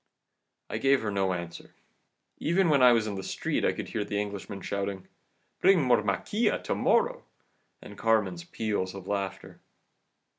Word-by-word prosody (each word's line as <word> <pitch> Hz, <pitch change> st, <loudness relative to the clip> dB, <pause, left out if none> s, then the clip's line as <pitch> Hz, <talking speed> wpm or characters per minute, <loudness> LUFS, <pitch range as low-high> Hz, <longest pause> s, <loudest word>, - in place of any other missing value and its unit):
"I -, -, -4 dB
gave 135 Hz, -2 st, +3 dB
her 105 Hz, -, -1 dB
no 95 Hz, -1 st, 0 dB
answer 85 Hz, -1 st, -6 dB, 0.6 s
even 170 Hz, +2 st, +2 dB
when 145 Hz, -3 st, +4 dB
I 125 Hz, -1 st, +8 dB
was 115 Hz, -2 st, +3 dB
in 105 Hz, -, -3 dB
the 95 Hz, -, -4 dB
street -, -, -2 dB
I -, -, +3 dB
could -, -, -6 dB
hear 105 Hz, -, -2 dB
the 100 Hz, 0 st, -2 dB
Englishman 100 Hz, -1 st, -5 dB
shouting, 100 Hz, -1 st, -4 dB, 0.5 s
'Bring 190 Hz, -1 st, +6 dB
more 125 Hz, -4 st, +4 dB
maquila 105 Hz, -, 0 dB
to -, -, -1 dB
morrow,' 485 Hz, +1 st, +1 dB, 0.6 s
and -, -, -11 dB
Carmen's 115 Hz, +10 st, +1 dB
peals 105 Hz, -, -3 dB
of 95 Hz, -2 st, -8 dB
laughter. 100 Hz, -1 st, -4 dB
105 Hz, 160 wpm, -28 LUFS, 100-135 Hz, 0.6 s, I